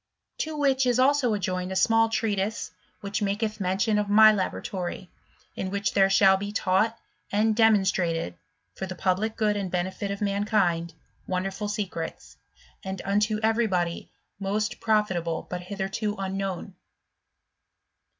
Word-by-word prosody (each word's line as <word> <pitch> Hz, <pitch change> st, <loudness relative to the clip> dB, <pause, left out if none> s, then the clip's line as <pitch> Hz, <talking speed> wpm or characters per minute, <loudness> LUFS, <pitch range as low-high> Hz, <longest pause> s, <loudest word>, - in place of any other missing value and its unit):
To 310 Hz, 0 st, -3 dB
which 270 Hz, -2 st, +2 dB
is 245 Hz, -1 st, +2 dB
also 260 Hz, -3 st, +3 dB
adjoined 185 Hz, -1 st, -2 dB
a -, -, -3 dB
small 225 Hz, +4 st, +4 dB
treatise 215 Hz, -2 st, -1 dB, 0.3 s
which 200 Hz, +1 st, -3 dB
maketh 210 Hz, +2 st, -1 dB
mention 195 Hz, +3 st, +1 dB
of 205 Hz, -1 st, -2 dB
my 215 Hz, +1 st, +8 dB
laboratory: 185 Hz, -2 st, -4 dB, 0.4 s
in 190 Hz, -, -3 dB
which 200 Hz, +1 st, -1 dB
there 195 Hz, -1 st, +4 dB
shall 195 Hz, 0 st, +5 dB
be 205 Hz, +1 st, -5 dB
taught 205 Hz, +3 st, +1 dB, 0.3 s
and 215 Hz, +2 st, +2 dB
demonstrated 190 Hz, -, +2 dB, 0.4 s
(for 190 Hz, -, -5 dB
the 185 Hz, -, -6 dB
public 190 Hz, +5 st, 0 dB
good 210 Hz, -1 st, +1 dB
and 200 Hz, -2 st, -2 dB
benefit 185 Hz, +3 st, -2 dB
of 200 Hz, 0 st, -3 dB
man 200 Hz, 0 st, 0 dB
kind) 175 Hz, -6 st, +1 dB, 0.4 s
wonderful 190 Hz, +3 st, -2 dB
secrets, 200 Hz, -6 st, -5 dB, 0.5 s
and 190 Hz, -1 st, -5 dB
unto 210 Hz, +2 st, +1 dB
every 225 Hz, +1 st, +2 dB
body 175 Hz, -3 st, -2 dB, 0.3 s
most 205 Hz, +2 st, -2 dB
profitable 190 Hz, -7 st, 0 dB
but 180 Hz, 0 st, -3 dB
hitherto 195 Hz, +3 st, -3 dB
unknown. 195 Hz, -1 st, -4 dB
200 Hz, 140 wpm, -26 LUFS, 185-215 Hz, 0.5 s, my